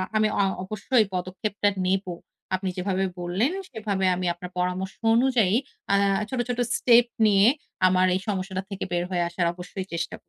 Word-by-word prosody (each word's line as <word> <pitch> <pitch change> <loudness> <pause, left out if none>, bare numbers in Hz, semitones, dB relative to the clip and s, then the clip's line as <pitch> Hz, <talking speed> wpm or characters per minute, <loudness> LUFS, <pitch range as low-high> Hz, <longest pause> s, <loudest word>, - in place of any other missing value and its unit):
আমি 215 0 +4
অ - - +5 0.2
অবশ্যই 215 +6 0
এই - - +2
পদক্ষেপটা 190 +3 -1 0.2
নেব। 190 +1 0 0.5
আপনি 190 0 -3
যেভাবে 190 +1 0
বললেন 185 - 0 0.2
সেভাবে 205 -5 -2
আমি 180 0 -3
আপনার 180 +1 -9
পরামর্শ 180 +1 -1 0.2
অনুযায়ী 235 -5 +3 0.4
আ - - +6 0.3
ছোট, 260 - -3
ছোট 245 0 -2 0.2
স্টেপ 240 -1 +5 0.2
নিয়ে 200 0 +5 0.4
আমার 185 0 +3
এই - - 0
সমস্যাটা 190 -2 -2
থেকে 195 -2 -4
বের 175 0 0
হয়ে 175 -2 0
আসার 175 0 -1
অবশ্যই 180 +2 -7
চেষ্টা 170 0 -3
190 Hz, 165 wpm, -25 LUFS, 180-215 Hz, 0.5 s, আ